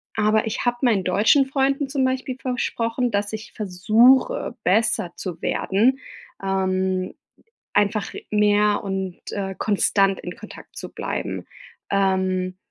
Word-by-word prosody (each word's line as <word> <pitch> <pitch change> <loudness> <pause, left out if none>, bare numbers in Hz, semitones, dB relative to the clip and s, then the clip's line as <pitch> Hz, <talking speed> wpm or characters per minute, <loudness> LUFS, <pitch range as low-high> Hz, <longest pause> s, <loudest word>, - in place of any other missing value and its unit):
Aber, 215 +1 +2
ich 220 - -3
habe 240 0 +1
meinen 220 -7 +3
deutschen 210 +9 +4
Freunden 275 +1 0
zum 270 -2 +1
Beispiel 260 0 -2
versprochen, 245 -1 -1
dass 205 +1 -1
ich 220 +1 -7
versuche, 225 - +3
besser 195 -3 +1
zu 180 -4 -6
werden, 240 +7 +1 0.4
ähm, 185 -1 0 0.6
einfach 205 +1 +1 0.2
mehr 210 0 +3
und, 190 -2 -3
äh, 195 -1 -3
konstant 195 -2 +2
in 180 - -7
Kontakt 215 - -12
zu - - -7
bleiben. - - -4 0.4
Ähm, 185 -2 0
210 Hz, 125 wpm, -23 LUFS, 190-245 Hz, 0.6 s, deutschen